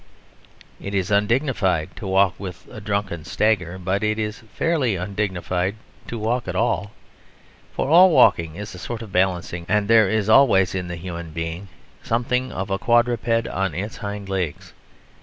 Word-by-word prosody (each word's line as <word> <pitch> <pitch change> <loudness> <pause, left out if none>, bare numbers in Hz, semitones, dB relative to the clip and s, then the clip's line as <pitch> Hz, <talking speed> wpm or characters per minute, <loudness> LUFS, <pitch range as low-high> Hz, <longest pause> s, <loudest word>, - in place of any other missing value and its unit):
It 100 0 -5
is 95 +1 -1
undignified 105 - +1
to 100 - -6
walk 95 -1 +3
with 95 -2 -8
a 110 - -9
drunken 100 -5 -2
stagger; 95 -2 0
but 95 +2 -1
it 110 0 0
is 105 -1 -3
fairly 145 -10 0
undignified 95 0 -2 0.3
to 120 - -5
walk 115 +2 -1
at - - -4
all, 110 -3 0 0.8
for - - -2
all 175 +5 +7
walking 85 - +4
is 105 +3 -7
a 90 - -9
sort 115 +4 -5
of 105 - -11
balancing, 90 -2 0
and 105 0 +2
there 110 -3 +5
is 110 -1 0
always 110 -6 +5
in 90 -2 -3
the 85 - -5
human 85 -2 -7
being 80 +4 -5 0.3
something 125 +2 -1
of 95 +1 -4
a 95 - 0
quadruped 120 -1 +2
on 95 -2 -2
its 105 +5 -4
hind 100 -1 -6
legs. 95 -6 -4
100 Hz, 165 wpm, -22 LUFS, 90-110 Hz, 0.8 s, all